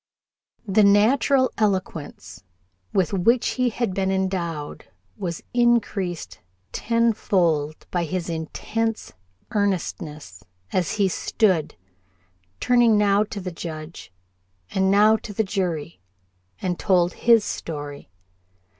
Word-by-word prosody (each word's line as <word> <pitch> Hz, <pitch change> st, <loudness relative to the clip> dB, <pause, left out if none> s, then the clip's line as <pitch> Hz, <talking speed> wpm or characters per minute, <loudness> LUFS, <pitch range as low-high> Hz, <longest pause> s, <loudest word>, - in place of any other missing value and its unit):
The 205 Hz, +2 st, +4 dB
natural 235 Hz, +6 st, +4 dB
eloquence 185 Hz, -, -2 dB, 0.5 s
with 190 Hz, 0 st, +1 dB
which 230 Hz, +6 st, +2 dB
he 255 Hz, -1 st, +1 dB
had 230 Hz, -3 st, -2 dB
been 190 Hz, 0 st, 0 dB
endowed 175 Hz, -6 st, -3 dB, 0.3 s
was 170 Hz, -3 st, -5 dB
increased 195 Hz, -, 0 dB, 0.3 s
tenfold 185 Hz, -10 st, 0 dB
by 175 Hz, -1 st, 0 dB
his 175 Hz, +1 st, -3 dB
intense 215 Hz, +7 st, -3 dB, 0.4 s
earnestness 160 Hz, -, -3 dB, 0.3 s
as 180 Hz, -3 st, 0 dB
he 200 Hz, -2 st, +2 dB
stood, 185 Hz, -2 st, 0 dB, 0.8 s
turning 240 Hz, -3 st, +4 dB
now 205 Hz, 0 st, +3 dB
to 215 Hz, -1 st, -7 dB
the 185 Hz, -1 st, -5 dB
Judge 160 Hz, -, -8 dB, 0.6 s
and 190 Hz, 0 st, +1 dB
now 210 Hz, +2 st, +5 dB
to 210 Hz, -, -9 dB
the 220 Hz, -, +1 dB
jury, 175 Hz, -, -3 dB, 0.6 s
and 180 Hz, -2 st, -2 dB
told 180 Hz, -3 st, +2 dB
his 230 Hz, -3 st, +4 dB
story. 145 Hz, -, -6 dB
190 Hz, 105 wpm, -23 LUFS, 165-215 Hz, 0.8 s, now